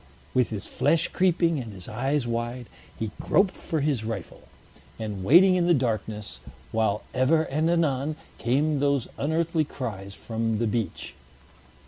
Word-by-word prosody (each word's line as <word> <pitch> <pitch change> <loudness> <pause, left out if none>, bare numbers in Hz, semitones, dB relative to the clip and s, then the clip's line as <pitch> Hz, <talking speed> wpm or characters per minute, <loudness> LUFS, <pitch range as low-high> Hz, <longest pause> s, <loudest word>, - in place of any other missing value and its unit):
With 125 -2 +3
his 105 -3 -4
flesh 165 0 +1
creeping, 170 -4 +2
and 115 -4 -6
his 90 -3 -10
eyes 135 +4 -1
wide, 120 +1 -3 0.3
he 110 -2 -3
groped 195 -1 +2
for 160 -2 -2
his 140 -6 0
rifle, 110 -5 -6 0.5
and 105 -4 -4
waited 180 - +7
in 175 -1 +2
the 175 - +5
darkness, 110 -5 -2 0.3
while 110 -2 +1
ever 135 +5 +3
and 155 +2 0
anon 155 -3 +1 0.2
came 145 +4 +1
those 140 -3 +1
unearthly 160 +2 +1
cries 100 -9 -6
from 115 -1 -2
the 115 - 0
beach. 110 -4 -2
130 Hz, 145 wpm, -26 LUFS, 110-155 Hz, 0.5 s, waited